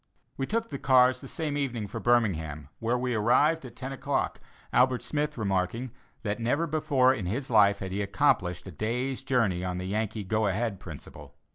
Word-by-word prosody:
We 135 - -3
took 230 +1 -1
the 140 - -5
cars 130 -1 +4
the - - -9
same 155 -4 -3
evening 125 -7 -2
for 100 - -6
Birmingham, 80 - +1
where 115 +2 0
we 125 0 -1
arrived 130 +9 +3
at 120 -2 -10
ten 130 +1 -6
o'clock, 135 +1 -2 0.3
Albert 125 0 +3
Smith 150 -2 -2
remarking, 100 +4 -1 0.3
that 105 0 -2
never 135 +8 +1
before 145 -5 +3
in 100 -8 -4
his 125 +7 -3
life 100 -2 +5
had 95 -1 -6
he 100 +2 -1
accomplished 90 -3 +1
a 95 - -7
day's 125 - -2
journey 115 -9 +1
on 90 -1 -2
the 90 - -4
Yankee 110 +2 -2
go 110 +2 +1
ahead 100 0 -1
principle. 80 -7 -11
115 Hz, 185 wpm, -28 LUFS, 100-130 Hz, 0.3 s, life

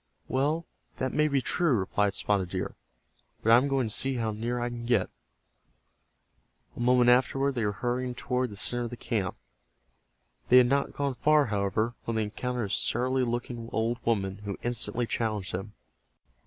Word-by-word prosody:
"Well, 150 +5 0 0.3
that 130 0 -2
may 150 0 +3
be 140 -3 +1
true," 170 -5 +2
replied 100 -1 +1
Spotted 100 -3 0
Deer. 95 0 -3 0.7
"But 115 - +4
I 115 - +9
am 130 +3 +2
going 135 -4 +1
to 110 - -2
see 135 0 -1
how 115 -2 -1
near 115 +3 -2
I 120 0 -1
can 120 -1 -6
get." 115 -6 +2 1.6
A - - -10
moment 125 0 +5
afterward 135 +2 +2
they 120 -3 -1
were 105 - +1
hurrying 125 +4 -2
toward 125 +1 -1
the 105 - -9
center 120 +3 -1
of - - -4
the 120 - -8
camp. 100 -8 -2 1.1
They 125 - +8
had 125 - +8
not 140 +3 +1
gone 140 -1 -1
far, 150 +4 +4
however, 105 +1 0
when 115 - -2
they 110 - +1
encountered 125 +3 -3
a - - -6
surly 130 +2 +1
looking 120 -1 -3
old 115 +2 0
woman 100 -4 0
who 100 -1 -5
instantly 120 -1 0
challenged 110 -4 -2
them. 95 +4 -5
120 Hz, 180 wpm, -28 LUFS, 105-130 Hz, 1.6 s, I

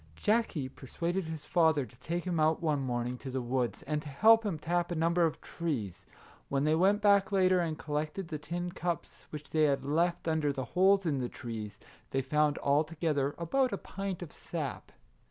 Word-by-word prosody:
Jackie 205 - +1
per 130 0 -13
suaded 175 +6 -2
his 160 -2 -6
father 160 -5 +3
to 120 - -17
take 170 +1 -3
him 175 -3 -1
out 155 +1 +3
one 150 -4 0
morning 125 -1 -2
to 135 - -7
the 130 0 -2
woods, 125 -1 -1
and 150 -1 -2
to 150 - -8
help 225 +10 +6
him 200 -7 -2
tap 175 +3 -1
a 175 - -2
number 170 +1 +3
of 155 - -6
trees. 130 - -4 0.4
When 140 0 +1
they 155 +1 +3
went 195 +6 +3
back 200 -1 +4
later 185 -2 +4
and 165 -3 -1
collected 155 +5 -3
the 155 -3 -4
tin 175 +3 -4
cups 170 -2 -4
which 150 -1 -8
they 155 -1 +4
had 140 -2 +1
left 170 +4 0
under 160 -2 +1
the 135 -2 -4
holes 190 +7 +3
in 145 -5 +1
the 125 -1 -2
trees, 110 -4 -6 0.3
they 135 0 -1
found 150 +2 +2
alto 150 +3 +2
gether 145 -3 0
about 255 +10 +1
a - - -1
pint 195 -3 -5
of 165 - -10
sap. 150 -6 -5
160 Hz, 205 wpm, -31 LUFS, 140-175 Hz, 0.4 s, help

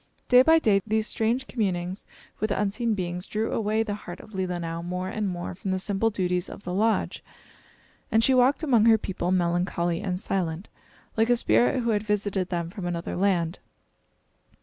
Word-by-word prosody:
Day 250 0 +8
by 320 +5 +6
day 210 -10 +3
these 220 0 +1
strange 230 +5 0
communings 190 -6 -2 0.3
with 215 - 0
unseen 210 +3 0
beings 180 0 -4
drew 215 +1 -2
away 220 0 +1
the 210 -2 -3
heart 180 -3 -8
of 215 - -13
Leelinau 175 -3 -3
more 180 +1 -3
and 210 -2 -2
more 175 0 -4
from 190 +2 -6
the 190 - +1
simple 200 +3 0
duties 180 -3 -1
of - - -10
the 180 - -4
lodge, 220 +3 0 0.9
and 225 +1 +4
she 265 - +4
walked 255 +5 +3
among 240 -8 +4
her 225 -1 +7
people, 185 -4 -3
melancholy 175 -1 0
and 185 -2 -2
silent, 180 -2 -2 0.5
like 225 +1 +2
a 245 - +4
spirit 120 - +3
who 230 - +1
had 210 -1 +1
visited 205 -3 -1
them 170 -2 -3
from 190 -3 -5
another 170 -1 -3
land. 180 -3 +1
195 Hz, 180 wpm, -26 LUFS, 175-220 Hz, 0.9 s, Day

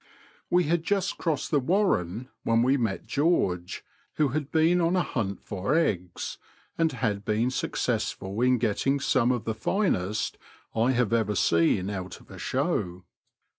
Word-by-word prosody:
We 180 0 +4
had 165 +1 0
just 195 +1 0
crossed 160 -4 -1
the 150 - +4
warren, 130 - 0
when 115 0 +2
we 130 +3 +3
met 115 -7 -1
George, 120 - 0 0.3
who 150 -2 +2
had 145 +1 -3
been 165 +3 +3
on 170 +2 +2
a 180 - +2
hunt 100 -5 -3
for 100 +8 -1
eggs, 90 - -1 0.4
and 165 -1 +2
had 110 -6 -2
been 110 +4 +1
successftil 110 -4 -2
in 125 0 +4
getting 120 +5 +1
some 125 -2 +2
of 125 -3 -1
the 110 - -1
finest 110 - -1 0.3
I 115 +4 +2
have 120 -3 +1
ever 110 -3 +1
seen 90 +2 +2
out 95 -2 -6
of - - -18
a - - -10
show. 90 0 -1
120 Hz, 160 wpm, -27 LUFS, 100-155 Hz, 0.4 s, We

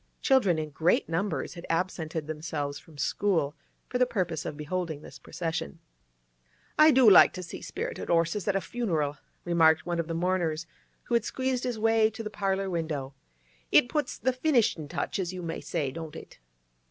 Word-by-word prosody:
Children 230 - +4
in 155 -1 -3
great 160 +5 +2
numbers 170 +1 -2
had 170 0 -9
absented 165 -2 -2
themselves 150 -2 -4
from 155 0 -17
school 160 -3 0 0.3
for 250 - -2
the 250 - +4
purpose 180 -9 -2
of 145 - -5
beholding 155 -1 -3
this - - -11
procession. 160 - -4 1.0
'I 305 +1 +9
do 260 -5 +6
like 200 - +8
to 185 - -6
see 175 - -8
spirited - - -5
'orses 170 +4 +1
at 200 - +2
a 195 - +1
funeral!' 160 -13 -1 0.3
remarked 160 -2 +4
one 175 -1 -2
of 165 - -1
the 165 - -3
mourners, 170 -2 0 0.4
who - - -5
had 235 -2 +3
squeezed 260 +1 -2
his 245 -3 -2
way 225 0 +3
to 225 +1 -7
the 215 - -5
parlour 195 -1 -1
window. 160 -6 -3 0.6
'It 245 - +6
puts 295 -2 -1
the 260 - 0
finishin' 250 - +1
touch, 170 +5 -3
as 185 -1 -2
you 180 -1 -6
may 165 -1 -4
say, 150 -6 -2
don't 160 0 -7
it? - - -11
175 Hz, 180 wpm, -28 LUFS, 160-215 Hz, 1.0 s, I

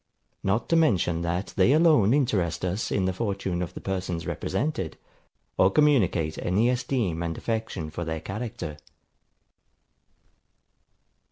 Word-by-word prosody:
Not 100 +4 0
to 165 - +3
mention 90 - +2
that 85 +3 -2
they 100 +8 +4
alone 155 - +5
interest 100 - +1
us 95 +5 -2
in 95 - +1
the 95 - 0
fortune 95 -3 -2
of 90 - -5
the - - -5
persons 90 -3 -3
represented, 115 - -2 0.6
or 95 - +6
communicate 100 - +2
any 105 +7 +2
esteem 120 -9 -1
and 85 -1 -3
affection 110 -8 -3
for 85 +3 -4
their 80 -1 -3
character. 105 -3 -5
95 Hz, 125 wpm, -26 LUFS, 85-120 Hz, 0.6 s, or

